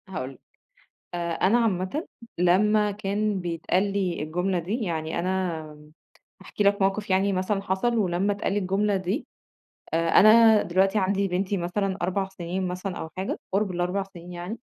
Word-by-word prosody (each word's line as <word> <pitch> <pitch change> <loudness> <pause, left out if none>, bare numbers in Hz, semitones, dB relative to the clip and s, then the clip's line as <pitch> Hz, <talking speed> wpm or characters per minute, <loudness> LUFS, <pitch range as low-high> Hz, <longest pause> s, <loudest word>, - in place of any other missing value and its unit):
هاقول 130 -8 -4
لك، - - -20 0.7
آآ، 170 -1 -2
أنا 195 +7 +3
عامةً 215 - -1 0.3
لمّا 210 +4 +3
كان 205 0 -1
بيتقال 175 +3 -1
لي 185 -6 -1
الجملة 180 +4 -1
دي، 200 +9 -3
يعني 160 -3 -2
أنا 180 -2 -1 0.8
هاحكي 210 - -3
لك 200 0 +3
موقف 195 +2 0
يعني 195 +1 +2
مثلًا 190 +2 0
حصل 200 +5 0
ولمّا 195 0 +1
اتقال 200 -1 -2
لي 205 - +1
الجملة 200 +2 +1
دي 190 - -3 0.7
آآ، 165 0 +1
أنا 220 +2 +7
دلوقتي 190 +4 +2
عندي 195 0 +1
بنتي 190 +2 -1
مثلًا 190 +2 -1
4 190 +2 -1
سنين 185 0 -4
مثلًا 180 +1 -4
أو 160 - -5
حاجة 190 +1 -3
قُرب 200 +1 +1
ال4 180 +2 -1
سنين 180 -2 -11
يعني، 175 +6 -6
190 Hz, 160 wpm, -25 LUFS, 175-205 Hz, 0.8 s, أنا